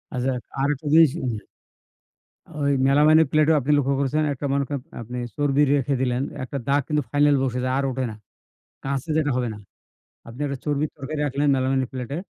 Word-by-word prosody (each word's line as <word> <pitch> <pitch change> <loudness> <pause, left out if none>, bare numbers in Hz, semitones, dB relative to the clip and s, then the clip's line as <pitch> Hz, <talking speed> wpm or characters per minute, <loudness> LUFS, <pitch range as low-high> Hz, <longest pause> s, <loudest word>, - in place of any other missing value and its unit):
আচ্ছা, 130 +1 0 0.3
আরেকটা 145 +2 -1
জিনিস 160 -4 +7 1.5
ওই 140 0 +2 0.2
মেলামাইনের 155 +3 +5
প্লেটেও 155 +1 +4
আপনি 140 +2 -1
লক্ষ্য 140 -1 +1
করেছেন 140 +3 +1
একটা 140 +1 -6
মনে 140 0 +1
করেন 140 -3 -3 0.2
আপনি 120 +2 -7 0.2
চর্বি 145 -1 +2
রেখে 140 0 +1
দিলেন। 125 0 0 0.2
একটা 135 +2 -5
দাগ 140 +1 +3
কিন্তু 150 -2 0
final 145 0 +4
বসে 125 -1 -1
যায় 130 0 0
আর - - 0
ওঠে 130 0 -2
না। - - -9 0.7
কাঁচে 140 +3 -3
যেটা 150 -2 +1
হবে 125 -1 0
না। - - -10 0.7
আপনি 115 +3 -11
একটা 140 -1 -3
চর্বির 150 0 0
তরকারি 145 +2 -5
রাখলেন 145 +1 0
মেলামাইনের 130 -1 0
প্লেটে, 130 +3 -4
140 Hz, 175 wpm, -23 LUFS, 130-145 Hz, 1.5 s, জিনিস